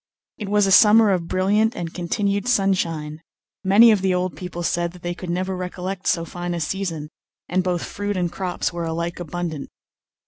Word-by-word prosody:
It 205 -3 -5
was 205 0 +3
a 195 - +1
summer 215 +1 +7
of 175 -3 -1
brilliant 205 +5 +2
and 165 -1 -5
continued 200 +4 -1
sunshine; 165 -8 0 0.4
many 215 +5 +7
of 210 -3 +2
the 190 -1 +1
old 180 0 -1
people 180 -2 -6
said 170 0 -1
that 180 - -15
they 175 0 -2
could 180 0 -8
never 185 +2 -1
recollect 185 +1 -5
so 165 -1 +1
fine 175 +1 -4
a - - -3
season, 165 -2 -3 0.4
and 185 +1 0
both 180 -2 -1
fruit 205 -1 -3
and 175 -2 -1
crops 180 -1 -3
were 170 -1 -3
alike 170 +2 -3
abundant. 170 -3 -5
180 Hz, 185 wpm, -22 LUFS, 170-195 Hz, 0.4 s, summer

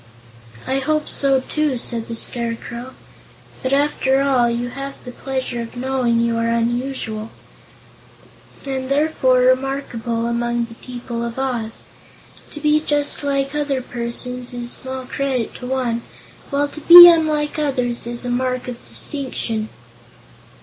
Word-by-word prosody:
"I 265 +1 0
hope 305 +2 0
so, 270 -2 +1
too," 300 -1 -1
said 235 -1 -3
the 230 - -5
Scarecrow. 235 +2 -3 0.7
"But, 260 - -2
after 275 -1 +2
all, 265 -4 +3
you 240 +1 -2
have 275 +2 -6
the 250 - -6
pleasure 260 -2 -4
of 230 +1 -8
knowing 250 -2 +1
you 235 0 +1
are 230 0 0
unusual, 230 -1 -2 1.4
and 265 -1 -3
therefore 275 -3 +2
remarkable 255 -3 0
among 235 0 0
the 230 - -12
people 240 -1 -6
of 235 +1 -5
Oz. 245 -4 -3 0.7
To 300 - -7
be 300 0 +3
just 290 -1 -1
like 275 -1 0
other 290 -3 0
persons 245 +1 -4
is 240 0 -5
small 260 0 -3
credit 260 -3 -2
to 250 - -7
one, 250 -3 -1 0.5
while 285 +1 +1
to 305 - -10
be 345 +2 +12
unlike 310 -3 +3
others 250 -5 -1
is 240 +1 -4
a - - -2
mark 255 0 -1
of 245 -1 -7
distinction." 230 -6 -4
255 Hz, 140 wpm, -20 LUFS, 235-275 Hz, 1.4 s, be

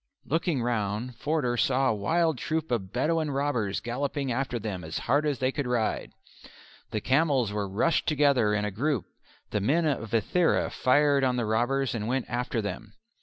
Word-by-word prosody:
Looking 160 -4 0
round 115 +1 -2
Forder 145 -3 0
saw 130 +2 +2
a - - +2
wild 160 +7 +1
troop 160 -3 -2
of 100 -6 -1
Bedouin 155 +5 0
robbers 135 -8 -1
galloping 135 +2 -2
after 125 0 -1
them 100 -5 -4
as 80 0 -4
hard 145 +5 +1
as 145 -3 0
they 130 +2 0
could 145 -2 -3
ride. 120 -3 -1 0.8
The 110 - -2
camels 135 -5 +2
were 105 -2 -2
rushed 155 - +1
together 140 -8 +3
in 105 0 0
a 105 - -2
group: 130 - -1 0.5
the 105 - 0
men 155 - +2
of 130 -7 -1
Ithera 140 - +2
fired 140 +1 +3
on 130 -1 +2
the 120 -2 0
robbers 120 +5 +1
and 110 -2 -3
went 130 +1 0
after 120 -2 -2
them. 100 -2 -6
125 Hz, 175 wpm, -27 LUFS, 110-145 Hz, 0.8 s, together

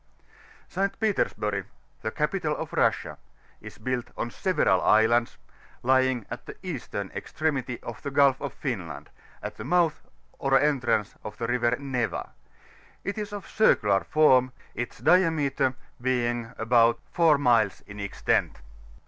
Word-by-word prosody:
ST. 195 +2 -2
PETEaSBTmO, 185 - 0 0.4
the - - -2
camtal - - -1
of - - -6
Russia, - - +1 0.4
is - - -11
built 125 +2 -2
on 120 - -3
several 150 - +2
islands, 115 +2 +3 0.5
l^ritig'at 130 -2 +1
the - - -8
eastern 125 - -5
extremity 135 -6 -2
of 120 - -7
the 140 - -4
Gulf 140 -1 +3
of 140 -2 -3
Finland, 110 - -5 0.3
at - - -6
the 110 - -6
mouth 165 +3 +2 0.4
or 135 -1 +3
entrance 130 -8 +1
of 105 - -8
the 115 - -3
River 120 0 +1
Neva; 130 -4 -3 0.7
it 200 +2 -3
is 210 0 -5
of 205 -1 -6
a - - -15
circular 105 - +3
form, 130 -5 +4 0.2
its 125 - -5
diameter 155 -7 +2 0.3
being 120 -2 0
about 115 +1 +3
4 165 -4 +4
miles 115 -7 +2
in 100 - -12
^Ktent. 100 -1 0
130 Hz, 135 wpm, -26 LUFS, 115-150 Hz, 0.7 s, form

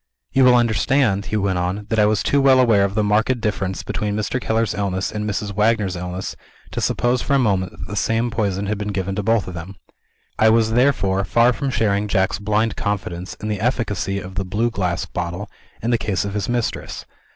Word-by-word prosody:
"You 135 -1 +5
will 125 -1 +7
understand," 115 -2 +2
he 110 - -1
went 95 -3 0
on, 95 +4 -2
"that 110 - +1
I 105 - +5
was 105 -1 +1
too 140 - +2
well 135 -1 +5
aware 115 -6 +4
of 100 0 -4
the 105 - +2
marked 110 +5 +2
difference 105 -4 -2
between 105 -2 -2
Mr. 110 +4 -2
Keller's 110 -1 0
illness 95 -2 -2
and 105 0 -3
Mrs. 100 +1 -3
Wagner's 105 -2 +1
illness 90 +1 -5 0.4
to - - -3
suppose 120 +1 +1
for 140 - +1
a - - +5
moment 95 -8 +1
that - - -8
the 105 - -6
same 115 +3 0
poison 100 -3 -1
had 105 0 -2
been 105 - -3
given 95 0 -2
to 100 - -2
both 115 0 +1
of 90 - -6
them. 85 +3 -7 0.6
I 110 - +6
was, 110 0 +3
therefore, 110 -6 +2
far 120 +5 +3
from 135 +5 -2
sharing 105 -4 +1
Jack's 95 -2 +1
blind 105 +2 0
confidence 95 -3 -3
in 105 - -7
the 105 -2 -2
efficacy 105 -5 -1
of 95 -1 -7
the 95 +1 -2
blue 105 +6 -1
glass 90 -3 -1
bottle, 90 +3 -5 0.3
in 120 - 0
the 120 - +2
case 100 -2 -1
of 100 - -4
his 105 +1 -2
mistress. 120 -2 -3
105 Hz, 220 wpm, -21 LUFS, 95-115 Hz, 0.6 s, will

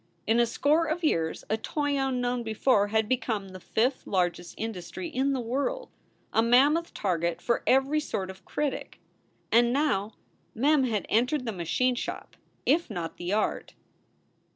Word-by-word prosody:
In 225 +2 +3
a 235 - +4
score 305 +7 +2
of 325 +3 -2
years 165 - 0
a 220 - 0
toy 290 +5 -1
unknown 250 -2 0
before 220 -1 +2
had 220 +1 +1
become 225 -5 -1
the 185 0 -9
fifth 245 +8 0
largest 175 -2 -1
industry 215 - -5
in 275 -2 0
the 265 - -1
world, 280 - -2 0.4
a 225 - +4
mammoth 280 +8 +4
target 170 -3 -1
for 235 +6 0
every 270 +4 +3
sort 190 -10 -3
of 190 0 -16
critic. 290 +9 -3 0.5
And 235 +1 +5
now 225 -7 0 0.4
Mem 275 +3 +3
had 220 -5 -1
entered 250 +5 +1
the 225 - -1
machine 185 +8 0
shop, 245 - -5 0.3
if 320 +4 +2
not 175 -6 -5
the 175 +1 -4
art. 215 +1 -1
240 Hz, 155 wpm, -28 LUFS, 200-275 Hz, 0.5 s, And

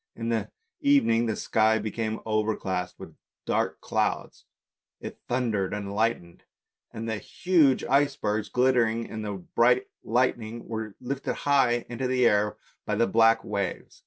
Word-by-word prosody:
In 115 0 -4
the 115 -1 -1 0.3
evening 275 - +3
the 110 - -1
sky 110 0 +2
became 110 +1 -3
overcast 105 -4 -1
with 80 -5 -11 0.3
dark - - -1
clouds; - - -2 0.5
it - - -8
thundered 110 -6 0
and 100 -1 -5
lightened, 105 -5 -1 0.5
and 115 +1 -6
the 110 -2 -2
huge 160 - +2
icebergs 135 -7 +1
glittering 120 -3 +2
in 110 - -6
the 105 -1 -4
bright 120 +7 +2 0.2
lightning, 120 -1 -1
were 110 -2 -5
lifted 135 +2 -3
high 125 -4 +2
into 125 +2 -3
the 125 -1 +2
air 105 -1 +2 0.3
by 105 - -2
the 115 +3 +3
black 115 0 +4
waves. 100 -3 -4
115 Hz, 140 wpm, -27 LUFS, 105-125 Hz, 0.5 s, black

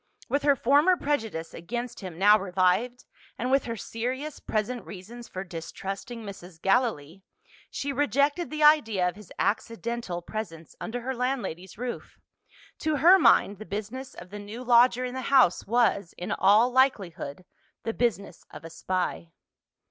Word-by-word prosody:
With 280 - 0
her 285 -1 +4
former 290 +9 +4
prejudice 225 - -2
against 240 +8 -5
him 185 -5 -8
now 205 +3 +6
revived, 195 +6 0 0.3
and 250 +2 -2
with 275 0 +3
her 230 -1 -4
serious 260 +8 -4
present 225 +3 -2
reasons 225 +5 -10
for 185 - -6
distrusting 195 +6 -7
Mrs. 185 -4 -10
Gallilee, 195 - 0 0.5
she 280 0 -3
rejected 290 +4 +1
the 305 0 -2
idea 225 -12 +5
of 180 - -3
his 210 -4 -14
accidental 230 -5 -2
presence 170 -7 -7
under 245 +2 -4
her 260 +2 -3
landlady's 245 -9 -3
roof. 245 +1 -6 0.6
To 310 -1 0
her 345 +7 +7
mind, 200 - +4
the - - -6
business 220 +6 -6
of 180 +1 -11
the 205 - -7
new 210 +5 -8
lodger 245 +1 +5
in 250 - -5
the 260 - -4
house 260 -10 +4
was, 215 -5 +1
in 180 - -5
all 215 +6 +4
likelihood, 190 - 0 0.4
the 225 - -2
business 205 -7 -2
of - - -11
a 165 - -9
spy. 180 0 -3
225 Hz, 155 wpm, -27 LUFS, 190-255 Hz, 0.6 s, her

